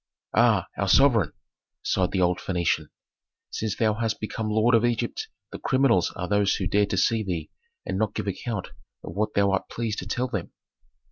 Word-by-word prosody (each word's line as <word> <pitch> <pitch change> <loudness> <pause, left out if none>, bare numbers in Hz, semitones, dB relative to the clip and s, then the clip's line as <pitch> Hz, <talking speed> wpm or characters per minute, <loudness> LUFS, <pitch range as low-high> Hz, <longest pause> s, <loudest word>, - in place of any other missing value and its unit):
"Ah, - - +4
our - - +1
sovereign!" 120 - +5 0.5
sighed 90 -1 +1
the 95 - 0
old 90 0 +2
Phœnician. 90 -3 0 0.6
"Since 110 -2 -2
thou 110 -1 +2
hast 110 0 -2
become 110 0 -3
lord 110 +3 +3
of 115 -1 +5
Egypt 120 0 -1 0.2
the - - -7
criminals 130 -9 +2
are 90 -2 -3
those 100 0 +2
who 95 - -2
dare 100 +2 +2
to - - -2
see 115 -1 +2
thee 90 -5 -4 0.3
and 95 - -2
not 110 -2 0
give - - -2
account 100 +1 -3 0.3
of 80 - -7
what 105 +3 -1
thou 100 -1 +3
art 95 - -1
pleased 115 -2 -3
to 90 - -6
tell 125 +5 -1
them." 100 -9 -4
105 Hz, 190 wpm, -26 LUFS, 95-115 Hz, 0.6 s, sovereign